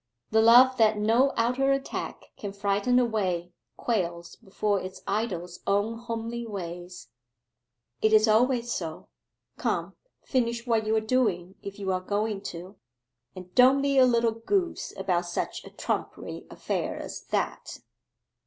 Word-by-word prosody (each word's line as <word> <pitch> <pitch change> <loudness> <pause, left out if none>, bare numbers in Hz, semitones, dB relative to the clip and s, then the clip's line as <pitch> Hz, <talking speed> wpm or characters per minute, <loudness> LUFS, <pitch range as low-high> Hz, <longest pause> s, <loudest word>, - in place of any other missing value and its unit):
The 220 0 +5
love 245 +3 +7
that 215 -1 +4
no 230 +6 +3
outer 250 +4 +2
attack 275 0 -4
can 200 -2 -6
frighten 200 +4 +1
away 190 -8 0 0.3
quails 170 -6 -2
before 200 0 -1
its 185 0 -8
idol's 185 -4 -3
own 205 +3 +1
homely 230 0 -4
ways; 180 - -7 0.9
it 220 - +3
is 215 +1 +6
always 240 +2 +3
so.... 160 -6 -5 0.5
Come, - - -2 0.3
finish 235 -2 -1
what 225 -3 +1
you 220 - +2
are - - +4
doing 215 -7 0
if 200 0 -8
you 195 -2 -2
are 185 0 -1
going 205 +1 -2
to, 180 +4 -9 0.6
and 180 -1 -10
don't 260 +2 +6
be 280 -1 +3
a 260 - +8
little 235 -2 +2
goose 350 - -1
about 175 -2 0
such 175 - -3
a - - -9
trumpery - - -4
affair - - -3
as - - -7
that. - - -3
215 Hz, 145 wpm, -27 LUFS, 190-235 Hz, 0.9 s, a